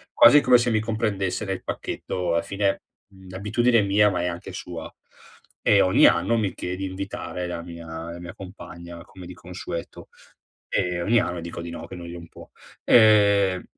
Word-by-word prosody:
quasi 150 Hz, -, +8 dB
come 125 Hz, -2 st, +6 dB
se 120 Hz, 0 st, 0 dB
mi 110 Hz, -, +2 dB
comprendesse 110 Hz, -3 st, -2 dB
nel 95 Hz, -1 st, -4 dB
pacchetto, 90 Hz, -2 st, -3 dB
alla 85 Hz, -, +2 dB
fine, 100 Hz, +1 st, -1 dB, 0.3 s
mhmm, 95 Hz, -1 st, -16 dB
l'abitudine 115 Hz, +6 st, +1 dB
è -, -, +2 dB
mia, 105 Hz, +1 st, +4 dB
ma 90 Hz, -3 st, -2 dB
è -, -, -1 dB
anche 90 Hz, +2 st, -5 dB
sua, 90 Hz, -3 st, -7 dB, 0.7 s
e 100 Hz, -1 st, +4 dB
ogni 95 Hz, -, +5 dB
anno 90 Hz, +7 st, +3 dB
mi 105 Hz, -5 st, -1 dB
chie 90 Hz, -, -5 dB
di 95 Hz, +1 st, -4 dB
invitare 95 Hz, -1 st, -5 dB
la 85 Hz, -1 st, -5 dB
mia 85 Hz, -1 st, -10 dB, 0.2 s
la 85 Hz, -, -8 dB
mia 85 Hz, -1 st, -9 dB
compagna 85 Hz, -3 st, -10 dB
come 90 Hz, 0 st, -13 dB
di 90 Hz, -, -9 dB
consueto, 90 Hz, -1 st, -8 dB, 0.6 s
e 90 Hz, -1 st, -1 dB
ogni 110 Hz, +6 st, +3 dB
anno 90 Hz, -3 st, -3 dB
dico 85 Hz, 0 st, -7 dB
di 85 Hz, -, -7 dB
no, 85 Hz, -, -8 dB
che -, -, -10 dB
noi 85 Hz, -1 st, -8 dB
non 85 Hz, -1 st, -10 dB
può. -, -, -13 dB, 0.4 s
Ehm, 100 Hz, -4 st, +5 dB
95 Hz, 185 wpm, -24 LUFS, 85-105 Hz, 0.7 s, quasi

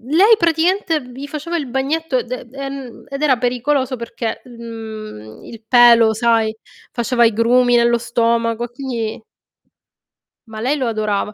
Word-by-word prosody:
lei 415 Hz, +5 st, +6 dB
praticamente 335 Hz, 0 st, +1 dB
gli 270 Hz, +3 st, -8 dB
faceva 310 Hz, +4 st, -4 dB
il 290 Hz, -, -4 dB
bagnetto, 270 Hz, +1 st, -1 dB
d 250 Hz, 0 st, -7 dB
ehm, 275 Hz, -3 st, -7 dB
ed 275 Hz, +1 st, -5 dB
era 285 Hz, -4 st, +4 dB
pericoloso 255 Hz, +2 st, -1 dB
perché, 235 Hz, 0 st, -5 dB
mhmm, 220 Hz, -, -9 dB
il 230 Hz, -2 st, -11 dB
pelo 235 Hz, -2 st, +6 dB
sai, 225 Hz, -1 st, +1 dB, 0.4 s
faceva 240 Hz, 0 st, +2 dB
i 225 Hz, -, +3 dB
grumi 245 Hz, +2 st, +3 dB
nello 235 Hz, 0 st, +3 dB
stomaco 230 Hz, 0 st, 0 dB
e 240 Hz, -, -6 dB
quindi 240 Hz, -4 st, -4 dB, 1.3 s
ma 220 Hz, -1 st, -8 dB
lei 260 Hz, +6 st, 0 dB
lo 265 Hz, -3 st, -2 dB
adorava. 215 Hz, -2 st, -1 dB
240 Hz, 145 wpm, -18 LUFS, 230-275 Hz, 1.3 s, lei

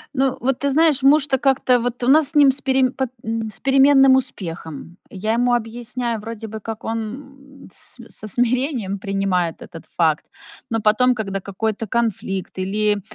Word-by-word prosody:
Ну, 265 Hz, 0 st, +1 dB
вот 265 Hz, 0 st, 0 dB
ты 280 Hz, -, 0 dB
знаешь, 300 Hz, 0 st, +3 dB
муж-то 280 Hz, 0 st, +4 dB
как-то 260 Hz, -2 st, +3 dB
вот 245 Hz, +1 st, -3 dB
у -, -, 0 dB
нас 290 Hz, +1 st, +5 dB
с -, -, -4 dB
ним 285 Hz, -2 st, +6 dB
с 270 Hz, +1 st, -5 dB
перем 265 Hz, -1 st, +2 dB
по 265 Hz, -, -2 dB
п -, -, -24 dB
м, 225 Hz, 0 st, -3 dB
с 210 Hz, -, -5 dB
переменным 270 Hz, 0 st, +5 dB
успехом. 170 Hz, -, -5 dB
Я 215 Hz, +3 st, -2 dB
ему 245 Hz, +1 st, +2 dB
объясняю, 235 Hz, 0 st, -3 dB
вроде 225 Hz, +1 st, -7 dB
бы 220 Hz, 0 st, -7 dB
как 220 Hz, +1 st, -7 dB
он, 225 Hz, 0 st, -2 dB, 0.6 s
м, -, -, -14 dB
с -, -, -7 dB
со 215 Hz, -, -8 dB
смирением 245 Hz, -3 st, -1 dB
принимает 190 Hz, -4 st, -1 dB
этот 165 Hz, -, -11 dB
факт, 160 Hz, -3 st, +2 dB, 0.4 s
но 225 Hz, -, 0 dB
потом, 245 Hz, +4 st, +3 dB
когда 195 Hz, -3 st, -3 dB
какой-то 215 Hz, +3 st, -3 dB
конфликт, 195 Hz, -5 st, -2 dB
или 205 Hz, +2 st, 0 dB
230 Hz, 180 wpm, -20 LUFS, 205-265 Hz, 0.6 s, ним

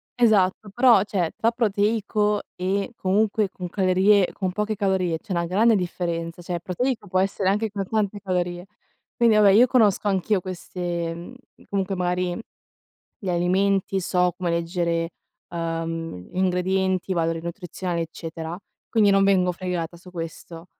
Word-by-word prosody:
esatto, 215 Hz, -4 st, +3 dB
però, 240 Hz, -4 st, +6 dB
cioè 185 Hz, -5 st, -1 dB
tra 230 Hz, -, +2 dB
proteico 210 Hz, -2 st, +1 dB
e 195 Hz, +5 st, -1 dB
comunque 205 Hz, +1 st, +1 dB
con 180 Hz, -2 st, -7 dB
calorie 190 Hz, +1 st, +3 dB
con 185 Hz, -2 st, -2 dB
poche 210 Hz, +2 st, -2 dB
calorie 190 Hz, -5 st, 0 dB
c'è 210 Hz, -, -12 dB
una 170 Hz, -1 st, 0 dB
grande 215 Hz, +6 st, +3 dB
differenza, 170 Hz, -2 st, -3 dB
cioè 175 Hz, 0 st, -3 dB
proteico 220 Hz, +6 st, -2 dB
può 185 Hz, 0 st, +1 dB
essere 195 Hz, 0 st, +1 dB
anche 210 Hz, +3 st, +1 dB
con 195 Hz, -2 st, -4 dB
tante 210 Hz, -2 st, -1 dB
calorie. 180 Hz, -2 st, -2 dB, 0.5 s
Quindi 230 Hz, -2 st, +4 dB
vabbè 210 Hz, -1 st, +6 dB
io 235 Hz, +5 st, +6 dB
conosco 215 Hz, -5 st, +3 dB
anch'io 195 Hz, +1 st, +1 dB
queste, 175 Hz, -2 st, -4 dB
uhm, 175 Hz, +9 st, -10 dB, 0.3 s
comunque 195 Hz, -1 st, -1 dB
magari 180 Hz, 0 st, -1 dB, 0.8 s
gli 195 Hz, -, -6 dB
alimenti, 190 Hz, +2 st, +1 dB
so 180 Hz, 0 st, +1 dB
come 180 Hz, -2 st, -2 dB
leggere, 170 Hz, 0 st, -1 dB, 0.4 s
uhm, 165 Hz, -, -4 dB
ingredienti, 185 Hz, 0 st, 0 dB
valori 165 Hz, -1 st, 0 dB
nutrizionali, 175 Hz, 0 st, -4 dB
eccetera. 165 Hz, +1 st, -6 dB, 0.3 s
Quindi 215 Hz, -3 st, +4 dB
non 195 Hz, 0 st, +4 dB
vengo 185 Hz, -2 st, +3 dB
fregata 175 Hz, -2 st, -4 dB
su 180 Hz, +2 st, -14 dB
questo. 165 Hz, 0 st, -8 dB
185 Hz, 140 wpm, -24 LUFS, 175-205 Hz, 0.8 s, però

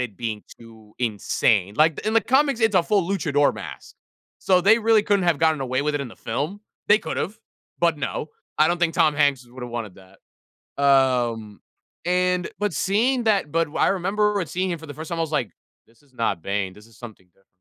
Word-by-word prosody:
it 120 Hz, -6 st, -4 dB
being 110 Hz, -3 st, -4 dB, 0.2 s
too 110 Hz, -2 st, -16 dB
insane. 105 Hz, -3 st, 0 dB
Like, 155 Hz, 0 st, +4 dB
the -, -, -7 dB
in 215 Hz, -, +1 dB
the 225 Hz, -, +5 dB
comics, 270 Hz, 0 st, +2 dB
it's 225 Hz, -3 st, +2 dB
a 180 Hz, -, +5 dB
full 195 Hz, -2 st, +1 dB
luchador 145 Hz, -7 st, +1 dB
mask. -, -, -9 dB, 0.4 s
So, 185 Hz, -1 st, +3 dB
they 215 Hz, +5 st, +5 dB
really 225 Hz, -1 st, +3 dB
couldn't 205 Hz, -3 st, +1 dB
have 170 Hz, -4 st, +2 dB
gotten 160 Hz, -3 st, +2 dB
away 130 Hz, +1 st, -1 dB
with 150 Hz, +1 st, -1 dB
it 145 Hz, -, -1 dB
in 135 Hz, -, -7 dB
the -, -, -14 dB
film. 145 Hz, -, -4 dB, 0.3 s
They 210 Hz, +1 st, +6 dB
could -, -, -5 dB
have, 210 Hz, +3 st, -3 dB, 0.4 s
but 170 Hz, -2 st, +2 dB
no. 145 Hz, +1 st, -4 dB, 0.3 s
I 155 Hz, -, +5 dB
don't 175 Hz, -, +1 dB
think 170 Hz, -1 st, +1 dB
Tom 160 Hz, -4 st, +3 dB
Hanks 145 Hz, -4 st, +1 dB
would 125 Hz, +1 st, -11 dB
have 120 Hz, -, -6 dB
wanted 110 Hz, -5 st, -5 dB
that. 95 Hz, 0 st, -21 dB, 0.4 s
Um, 120 Hz, -6 st, +2 dB, 0.4 s
and 180 Hz, 0 st, +1 dB
but 205 Hz, 0 st, -1 dB
seeing 235 Hz, +6 st, +1 dB
that 200 Hz, -8 st, +1 dB
but 165 Hz, 0 st, +2 dB
w 145 Hz, -, -7 dB
I -, -, +4 dB
remember 200 Hz, +2 st, 0 dB
seeing 185 Hz, +5 st, -2 dB
him 170 Hz, -, -3 dB
for 160 Hz, -, -11 dB
the 145 Hz, -, -9 dB
first 160 Hz, +1 st, -8 dB
time, 170 Hz, -, -4 dB
I -, -, +1 dB
was 160 Hz, -1 st, -4 dB
like, 125 Hz, -9 st, -1 dB, 0.4 s
"This 115 Hz, +2 st, -27 dB
is 140 Hz, -3 st, -29 dB
not 115 Hz, -8 st, -1 dB
Bane. 100 Hz, -1 st, -2 dB
This 105 Hz, +3 st, -16 dB
is 115 Hz, -, -21 dB
something 110 Hz, -6 st, -12 dB
different." 95 Hz, +2 st, -35 dB
150 Hz, 225 wpm, -23 LUFS, 120-190 Hz, 0.4 s, They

